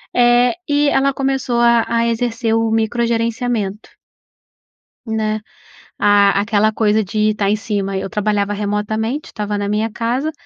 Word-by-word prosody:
eh, 245 +1 +4
e 290 0 +2
ela 275 0 +2
começou 270 -3 -1
a 235 -1 +4
a 230 0 +1
exercer 230 0 -1
o 225 0 +1
micro 225 +2 0
gerenciamento 230 -3 -2 1.2
né, 215 -1 -1 0.6
a 200 -1 +4
aquela 215 0 +2
coisa 215 0 +2
de 215 +2 0
tá 200 -1 -1
em 210 - +3
cima 200 -2 -3
eu 190 - -4
trabalhava 205 -1 -1
remotamente, 215 +6 -2
estava 210 -1 -3
na 205 0 -2
minha 215 +2 0
casa, 245 +8 -2
220 Hz, 145 wpm, -18 LUFS, 210-235 Hz, 1.2 s, eh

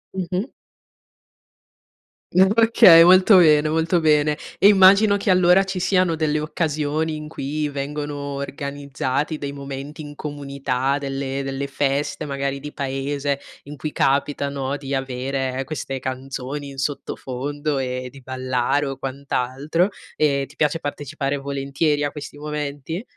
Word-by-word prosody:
Mh-mh. 185 +5 -2 1.8
Okay, 200 -2 +7
molto 185 +3 +7
bene, 155 -3 +5
molto 165 +3 +1
bene. 150 -1 +3 0.2
E 200 - +7
immagino 200 +1 +6
che, 200 -1 +1
allora, 180 +1 +5
ci 190 -1 -4
siano 185 -1 +2
delle 155 -1 0
occasioni 155 0 -1
in 150 0 -7
cui 150 0 -3
vengono 145 +1 -4 0.2
organizzati 140 +1 -3
dei 140 -1 -4
momenti 140 +2 -7
in 145 - -9
comunità, 140 -2 -2
delle 135 -1 -3
delle 135 0 -3
feste 140 +2 -1
magari 140 -1 -3
di 150 +2 -8
paese 140 +1 -2 0.2
in 145 +1 -10
cui 150 +3 -4
capita, 140 +1 +1
no, 140 0 -3
di 140 -1 -6
avere 135 0 -2
queste 135 -1 -5
canzoni 135 +2 -5
in 135 - -11
sottofondo 145 +1 -3
e 125 -1 -3
di 135 +1 -14
ballare 130 +2 -1
o 135 -1 -4
quant'altro. 140 +5 -1 0.3
E 140 -2 +1
ti 145 - -18
piace 150 +1 +1
partecipare 145 -1 -3
volentieri 140 +2 -1
a 145 - -1
questi 145 0 -9
momenti? 150 - -4
145 Hz, 130 wpm, -22 LUFS, 135-155 Hz, 1.8 s, Okay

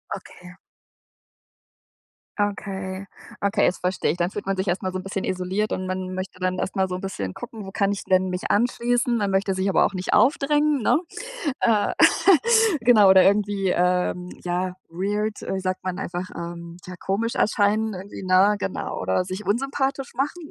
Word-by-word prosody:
Okay. 180 0 -12 1.9
Okay. 195 -1 -3 0.4
Okay. 200 0 +2
Das 185 - 0
verstehe 180 +1 0
ich. 175 - -5
Dann 175 +2 0
fühlt 205 - -6
man 195 -1 0
sich 190 +1 -2
erstmal 185 +1 -1
so 185 - -3
'n 185 - -6
bisschen 195 0 -4
isoliert 190 +3 -1
und 185 - -2
man 185 0 -4
möchte 185 0 -6
dann 185 0 -1
erstmal 190 0 -1
so 180 - -4
'n 185 - -6
bisschen 100 - -4
gucken, 220 -3 -8
wo 195 - -8
kann 200 0 +1
ich 200 - -4
denn 185 0 +2
mich 180 0 -4
anschließen? 240 +2 +1
Man 205 -2 0
möchte 195 0 +1
sich 190 +1 0
aber - - +4
auch - - -2
nicht 185 0 -3
aufdrängen, 295 0 +3
ne? 220 - +3 0.6
Äh. 215 -3 +2 0.9
Genau. 225 -4 +6
Oder 190 -1 +8
irgendwie, 200 -1 +2
äh, 180 0 +2 0.3
ja, 180 +1 -2
weird, 205 +5 -2
äh, 190 - -3
sagt 185 0 -3
man 185 -1 -3
einfach, 175 +1 -4
ähm, 170 0 -7
ja, 180 -1 -8
komisch 225 +7 -2
erscheinen 215 +1 +2
irgendwie, 190 +1 -8
ne? 190 +3 +4
Genau, 195 - -4
oder 185 - 0
sich 190 +3 -6
unsympathisch 270 +3 -1
machen, 295 +4 -3
190 Hz, 175 wpm, -24 LUFS, 185-210 Hz, 1.9 s, Oder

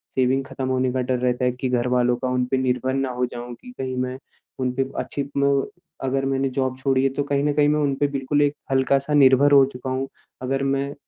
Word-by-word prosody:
Saving 130 +1 +1
ख़त्म 130 -1 -5
होने 130 0 +1
का 130 - 0
डर 125 0 -1
रहता 125 0 0
है 125 - +2
कि 125 +1 -4
घरवालों 125 0 +2
का 130 - -3
उन 125 0 0
पे 135 - +2
निर्भर 130 0 0
ना 135 0 -1
हो 125 0 -1
जाऊँ 120 0 -7
कि 250 - -11
कहीं 130 -1 -3
मैं 125 0 -2 0.4
उन 130 -1 0
पे 135 0 +1
अच्छी 140 - -3
क्लो 140 0 +1 0.4
अगर 135 +1 0
मैंने 135 0 0
जॉब 130 0 -2
छोड़ी 130 0 +1
है 135 - +3
तो 145 - -1
कहीं 140 0 0
न 145 0 +1
कहीं 145 0 +3
मैं 150 +1 +2
उन 140 -2 +1
पे 145 +1 +1
बिल्कुल 140 +1 -1
एक 145 0 +2 0.2
हल्का-सा 135 +2 +1
निर्भर 140 0 +5
हो 140 -1 +7
चुका 125 +1 -6
हूँ। 130 +1 -2 0.3
अगर 135 +1 -1
मैं 135 +1 -1
130 Hz, 240 wpm, -23 LUFS, 125-140 Hz, 0.4 s, हो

